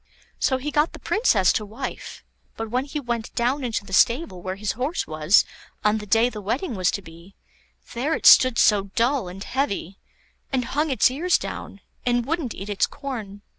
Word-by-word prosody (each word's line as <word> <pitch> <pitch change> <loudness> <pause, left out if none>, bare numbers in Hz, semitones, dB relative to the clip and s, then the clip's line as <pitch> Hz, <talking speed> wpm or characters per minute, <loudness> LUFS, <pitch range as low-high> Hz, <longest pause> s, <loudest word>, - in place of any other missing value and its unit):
So 260 - +2
he 290 +3 -4
got 300 +3 +1
the - - -8
Princess 225 - +2
to 215 - -1
wife; 225 +6 -7 0.3
but 225 -1 -5
when 255 +2 0
he 295 +1 -4
went 235 -4 -4
down 255 +4 0
into 225 -4 -2
the 190 - -10
stable 235 - +2
where 185 +1 -4
his 205 +1 -2
horse 265 +8 -2
was 155 +5 +3 0.4
on 210 +1 +3
the 210 - -9
day 225 +4 +4
the 215 -4 -6
wedding 240 - -2
was 185 -2 +1
to 200 - -3
be, 170 +3 -15 0.6
there 275 +7 0
it - - -6
stood 255 -3 +8
so 205 -2 +4
dull 240 -2 +1
and 190 +2 -8
heavy, 200 - -3 0.5
and 255 -3 0
hung 300 +3 +1
its 260 -1 +3
ears 340 +7 +2
down, - - -7 0.2
and 245 -1 +1
wouldn't 305 -5 -2
eat 195 - -7
its 205 -1 +1
corn. 215 -8 -7
235 Hz, 195 wpm, -24 LUFS, 200-270 Hz, 0.6 s, stood